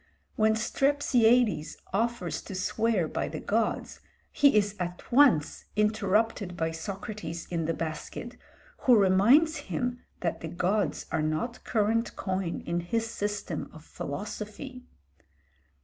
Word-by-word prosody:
When 220 0 +3
Strepsiades 240 - +2 0.2
offers 205 -6 -1
to 195 - -6
swear 195 -1 +1
by - - -2
the - - -5
gods, - - -1 0.3
he 285 -6 +5
is 205 0 +2
at 175 0 -5
once 240 - +4
interrupted 210 -2 +1
by 160 0 0
Socrates 170 0 -6
in 165 -2 -1
the 165 - 0
basket, 165 +9 -5 0.5
who 250 - +8
reminds 225 - +5
him 245 -1 -2 0.2
that 170 - -2
the 165 - -4
gods 185 +5 0
are - - +1
not 155 +11 -2
current 225 +1 +1
coin 185 -3 -2
in 170 +1 -1
his 225 +6 -2
system 205 -6 -3
of 155 0 -13
philosophy. 210 - -6
205 Hz, 125 wpm, -28 LUFS, 175-230 Hz, 0.5 s, who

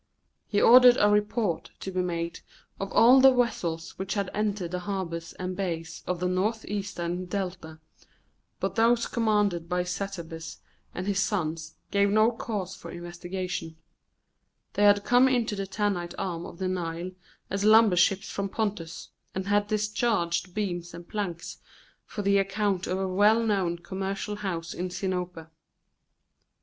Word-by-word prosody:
He 205 - +1
ordered 245 +2 +8
a 205 - +5
report 210 -2 0
to 190 - -4
be 185 0 0
made 170 -1 -3 0.4
of 195 0 -4
all 255 +3 +7
the 265 0 +8
vessels 175 -10 -1
which 190 +1 -3
had 200 -2 -1
entered 205 -4 -1
the 180 - -2
harbours 175 -3 -4
and 185 0 -4
bays 170 -4 -4
of 180 -1 -1
the 180 - 0
northeastern 190 -2 -2
Delta, 180 -4 -4 0.8
but - - -1
those 230 +1 +3
commanded 210 -7 +1
by 180 0 +1
Satabus 175 -3 -5 0.4
and 180 - -3
his 200 -1 0
sons 165 -6 -2 0.2
gave 200 0 +3
no 215 +3 +4
cause 210 -5 -4
for - - -10
investigation; 175 -1 -5 1.0
they 205 - +3
had 205 0 +5
come 245 +3 +5
into 240 -5 +1
the 195 -1 -4
Tanite 190 -3 -2
arm 175 -2 -3
of - - -11
the 185 - -2
Nile 175 -1 -3 0.4
as 195 +1 -1
lumber 215 -2 +6
ships 190 +2 +3
from 200 0 -3
Pontus, 190 -7 -3 0.3
and 190 0 -2
had 205 0 +2
discharged 210 -4 0
beams 175 -5 -3
and 170 0 -10
planks 180 -6 -4 0.5
for 205 - -5
the 200 0 +4
account 195 -1 0
of 185 - -1
a 190 0 -1
well 205 +5 +4
known 190 -6 0
commercial 195 +3 -4
house 175 -5 -4
in 180 +1 -3
Sinope. 180 -3 -3
190 Hz, 150 wpm, -27 LUFS, 175-210 Hz, 1.0 s, ordered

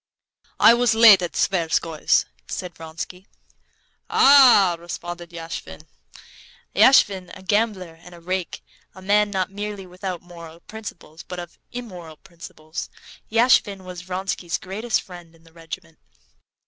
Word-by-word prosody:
"I - - +8
was 240 -2 +2
late 220 -4 +8
at 175 - -4
the - - -6
Tverskoys'," 165 -4 +1 0.2
said 180 -1 -6
Vronsky. 165 +4 -8 0.8
"Ah!" 250 -10 +6
responded 175 0 -7
Yashvin. 165 - -8 0.9
Yashvin, 200 -5 +4
a 190 - -15
gambler 195 -5 -1
and 180 0 -13
a - - -14
rake, 185 +1 -4 0.3
a 190 - -12
man 205 +2 +3
not 190 -2 -2
merely 205 -1 -6
without 180 -1 -6
moral 170 -1 -12
principles, 185 -7 -10
but 180 - -9
of 175 -1 -9
immoral 180 -10 -9
principles, 165 -3 -9 0.4
Yashvin 225 -4 +3
was 180 -1 -8
Vronsky's 180 -1 -3
greatest 215 +5 -3
friend 175 -2 -13
in 165 - -24
the 165 -1 -21
regiment. 165 - -10
180 Hz, 130 wpm, -22 LUFS, 170-205 Hz, 0.9 s, I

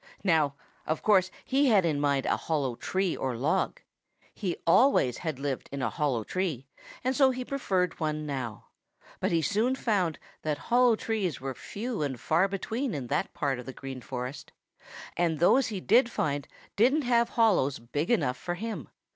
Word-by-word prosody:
Now, 155 -7 +3 0.3
of 155 - -1
course, 190 -3 +4 0.2
he 275 +2 +3
had 205 -7 +5
in 155 -4 +1
mind 140 -2 +1
a - - +2
hollow 145 -6 -1
tree 185 +8 -1
or 130 -3 -2
log. 145 +7 0 0.5
He 185 -5 -3
always 165 - +4
had 160 -6 -3
lived 140 -1 -3
in 140 -1 -3
a - - 0
hollow 135 -7 0
tree, 160 - -2 0.4
and 260 +1 +1
so 270 -1 +5
he 255 -1 -3
preferred 190 -11 -1
one 155 -1 -2
now. 130 -7 -5 0.5
But - - 0
he 165 -1 +2
soon 225 - +1
found 195 -10 0 0.2
that 150 -2 -1
hollow 245 +6 +3
trees 215 -7 -2
were 135 0 -4
few 225 - -5
and 135 -4 -2
far 170 +5 +2
between 220 - -3
in 135 -3 -4
that 150 - 0
part 135 -3 -1
of 125 - -9
the 130 - -6
Green 135 -1 -7
Forest, 125 +2 -6 0.6
and 170 -2 +1
those 240 - +4
he 210 -4 -4
did 235 +6 +4
find 145 - -2 0.3
didn't 265 +9 +3
have 235 -1 +3
hollows 190 - +3
big 145 +7 -3
enough 125 - +2
for 175 +7 -4
him. 220 +4 -5
170 Hz, 180 wpm, -28 LUFS, 140-225 Hz, 0.6 s, had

